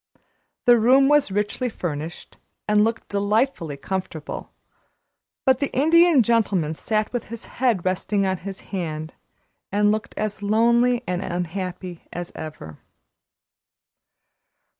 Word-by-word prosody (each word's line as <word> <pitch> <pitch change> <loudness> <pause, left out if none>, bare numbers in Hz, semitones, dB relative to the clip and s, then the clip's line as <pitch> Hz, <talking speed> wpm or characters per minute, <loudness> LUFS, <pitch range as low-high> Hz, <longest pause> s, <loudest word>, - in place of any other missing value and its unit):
The 240 -2 +7
room 260 +4 +5
was 295 -7 +4
richly 210 +5 -1
furnished, 165 -5 -6 0.3
and 210 0 +4
looked 225 +1 -2
delightfully 205 - 0
comfortable, 160 0 -5 0.9
but 260 -1 +4
the 280 - -1
Indian 320 0 +5
Gentleman 200 -9 +1
sat 215 +7 -1
with 245 - -2
his 230 0 -7
head 235 -8 0
resting 195 +2 0
on 190 -1 0
his 195 +2 -7
hand, 155 -4 -4 0.6
and 205 +1 +3
looked 215 0 -3
as 210 -1 -3
lonely 235 +4 +3
and 180 0 -2
unhappy 180 0 -4
as 175 0 -6
ever. 80 - -8
205 Hz, 120 wpm, -23 LUFS, 175-235 Hz, 0.9 s, The